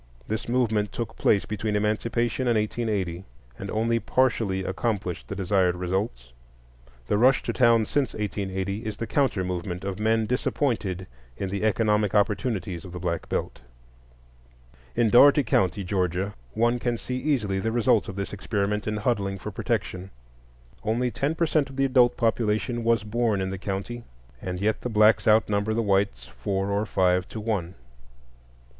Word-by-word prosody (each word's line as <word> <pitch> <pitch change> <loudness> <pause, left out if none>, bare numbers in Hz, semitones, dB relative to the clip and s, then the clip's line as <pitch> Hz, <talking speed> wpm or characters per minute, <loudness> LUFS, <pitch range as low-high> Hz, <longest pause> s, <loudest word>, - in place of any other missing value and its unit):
This 110 +2 -3
movement 110 -5 +1
took 115 - -5
place 100 - +2
between 105 0 -2
Emancipation 115 +4 0
and 120 -2 +3
1880, 105 -5 -2 0.4
and - - -6
only 115 +2 +1
partially 115 -7 +1
accomplished 95 -2 -2
the 100 - -5
desired 95 -2 +2
results. 90 - -3 0.7
The 105 - +1
rush 130 +2 +4
to - - -2
town 115 -3 +4
since 140 0 -1
1880 100 0 -3
is 110 -2 -4
the 115 - -3
counter 130 -6 +1
movement 90 0 -4
of 100 0 -4
men 110 +1 +2
disappointed 110 -6 -1 0.3
in 95 - -3
the 100 +2 -3
economic 105 -1 +2
opportunities 100 -4 0
of 90 -2 -10
the 90 - -5
Black 85 -1 -3
Belt. - - -3 1.3
In 115 -3 +2
Dougherty 140 +4 +7
County, 100 -3 +1
Georgia, 95 +1 -1 0.2
one 120 +2 +2
can 120 -1 -1
see 125 +2 -4
easily 120 -9 0
the 110 +4 -1
results 115 -2 +2
of 100 - -6
this 100 +1 -4
experiment 105 +1 -2
in 105 0 -1
huddling 100 -3 -1
for 95 - -6
protection. 95 +1 -3 0.7
Only 120 +3 0
ten 145 +6 -1
per 165 - +1
cent 150 -3 +1
of 135 - -11
the 135 0 +2
adult 125 -2 +4
population 115 +1 0
was 115 -1 +2
born 110 -1 0
in 95 0 -2
the 95 - -5
county, 100 +5 -4 0.4
and 90 -1 -4
yet 105 +3 0
the 125 - -3
blacks 110 0 +4
outnumber 105 0 +3
the 115 - +1
whites 95 - +1
four 95 +12 -3
or 100 +2 0
five 90 -1 +2
to 110 - -6
one. 105 -6 -2
105 Hz, 165 wpm, -26 LUFS, 95-115 Hz, 1.3 s, Dougherty